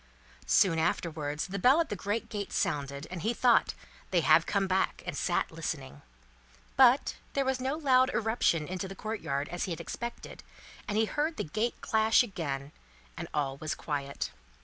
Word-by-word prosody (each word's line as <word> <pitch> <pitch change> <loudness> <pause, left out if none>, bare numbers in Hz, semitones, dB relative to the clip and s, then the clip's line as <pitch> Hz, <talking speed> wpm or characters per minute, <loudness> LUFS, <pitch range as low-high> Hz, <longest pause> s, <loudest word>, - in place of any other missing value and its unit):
Soon 175 -5 +4
afterwards, 155 -3 -1
the 195 +1 -4
bell 260 - +5
at 330 - +1
the - - -2
great 205 +4 -2
gate 205 -2 -5
sounded, 140 0 -1
and 180 -2 -5
he 230 +7 0
thought, 245 -1 +3 0.3
"They 175 -2 +2
have 160 +1 +5
come 200 -1 +1
back!" 190 0 0
and - - -4
sat - - 0
listening. 70 +2 -5 0.7
But, - - +5 0.2
there 275 - +1
was 265 0 0
no 265 +3 -1
loud 260 -4 +4
irruption 220 -9 +1
into 185 +1 -4
the 195 - -8
courtyard, 160 -10 -3
as 175 +1 -3
he 185 - -5
had 165 - -4
expected, 235 0 -6 0.5
and 210 -2 -1
he 220 - +4
heard 305 +7 -1
the - - -1
gate 215 +9 -2
clash 220 +2 +4
again, 145 - -4 0.4
and - - -6
all 135 -2 -1
was 155 +2 -3
quiet. 140 -2 -4
190 Hz, 175 wpm, -30 LUFS, 150-225 Hz, 0.7 s, bell